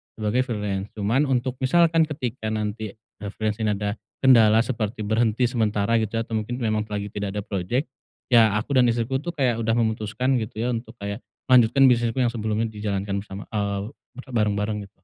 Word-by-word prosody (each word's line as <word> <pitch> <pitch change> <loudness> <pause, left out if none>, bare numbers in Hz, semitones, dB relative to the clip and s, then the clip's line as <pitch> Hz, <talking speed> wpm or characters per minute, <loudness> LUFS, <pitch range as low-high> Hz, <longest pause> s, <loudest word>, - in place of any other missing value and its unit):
sebagai 110 +2 0
freelance 105 -3 -3
cuman 115 +8 +1
untuk 130 -1 0
misalkan 165 +4 +4
ketika 130 -6 -4
nanti, 105 -1 -3
eee, 105 -1 -10
freelance 110 0 -2
ini 105 - +2
ada 100 +1 -2 0.3
kendala 115 -4 +6
seperti 115 -3 -3
berhenti 115 +2 +2
sementara 110 -2 0
gitu, 110 +1 -2
atau 115 0 -3
mungkin 120 +3 -5
memang 110 -3 0
lagi 105 0 -3
tidak 100 -1 -3
ada 105 - -1
project, 100 +8 -2 0.4
ya 115 -3 +6
aku 140 +6 -3
dan 125 -1 +5
istriku 120 +3 -1
tuh 175 - -3
kayak 130 -6 +1
udah 115 - +1
memutuskan 110 +3 0
gitu 110 0 -6
ya - - 0
untuk 115 0 -7
kayak 100 +3 -5 0.2
melanjutkan 130 +2 +6
bisnisku 120 0 +2
yang 125 - +3
sebelumnya 110 0 -1
dijalankan 100 -2 -2
bersama 100 0 -8
eee, 100 -1 -2 0.3
berbareng-bareng 105 -4 -1
gitu. - - -31
110 Hz, 175 wpm, -24 LUFS, 105-125 Hz, 0.4 s, kendala